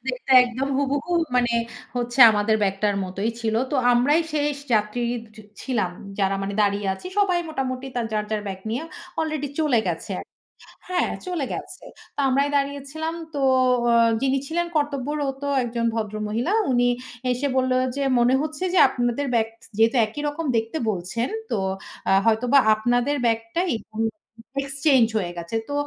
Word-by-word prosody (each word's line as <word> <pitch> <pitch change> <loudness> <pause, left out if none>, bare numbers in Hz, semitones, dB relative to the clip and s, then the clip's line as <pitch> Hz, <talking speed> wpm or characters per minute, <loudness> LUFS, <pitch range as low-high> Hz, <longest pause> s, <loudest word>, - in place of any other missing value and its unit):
দেখতে - - -4
একদম 250 +3 -3
হুবুহু 285 +4 -1 0.2
মানে 245 -1 +2 0.4
হচ্ছে 245 +1 -1
আমাদের 215 +1 +2
ব্যাগটার 200 +1 +1
মতোই 195 +4 -2
ছিল। 220 -1 -1 0.2
তো - - -2 0.2
আমরাই 270 +7 +4
শেষ 295 -1 0 0.2
যাত্রী 210 +3 0 0.6
ছিলাম। 215 -9 -1 0.3
যারা 195 -1 +2
মানে 200 +1 -3
দাঁড়িয়ে 200 0 0
আছি 190 - -11
সবাই 375 -4 +3
মোটামুটি 265 -3 -3 0.3
যার, 210 -1 0
যার 215 -1 -1
ব্যাগ 190 -1 -5
নিয়ে 245 +6 -2 0.4
আলরেডি 310 -3 -2
চলে 290 -7 +3
গেছে। 170 +4 -4 0.8
হ্যাঁ, 365 - 0 0.2
চলে 345 -6 -1
গেছে। - - -7 0.3
তো - - -7
আমরাই 275 +2 +2
দাঁড়িয়েছিলাম। 285 +3 -2 0.2
তো 285 - -3 0.5
আ - - +4 0.3
যিনি 270 0 +2
ছিলেন 345 +1 -1
কর্তব্যরত 285 -1 -1 0.2
একজন 235 0 -2
ভদ্র 215 -2 -3
মহিলা। 235 - -1 0.2
উনি 245 -1 +3 0.5
এসে 250 +3 -1
বলল 260 0 +2 0.2
যে, 280 - -2 0.2
"মনে 245 +2 +4
হচ্ছে 310 +3 -4
যে 375 - +4
আপনাদের 245 +2 -1
ব্যাগ 225 -1 +2 0.3
যেহেতু 225 +3 +4
একই 260 +7 -6
রকম 305 +3 -3
দেখতে 225 +7 -2
বলছেন, 210 +5 -2 0.2
তো - - 0 0.5
আ - - +4
হয়তোবা 240 +5 +4
আপনাদের 245 +6 +1
ব্যাগটাই 230 +9 0 0.9
এক্সচেঞ্জ 275 -2 +3
হয়ে 180 -4 -2
গেছে।" 170 +6 -5
তো - - -3
250 Hz, 150 wpm, -23 LUFS, 220-285 Hz, 0.9 s, আমরাই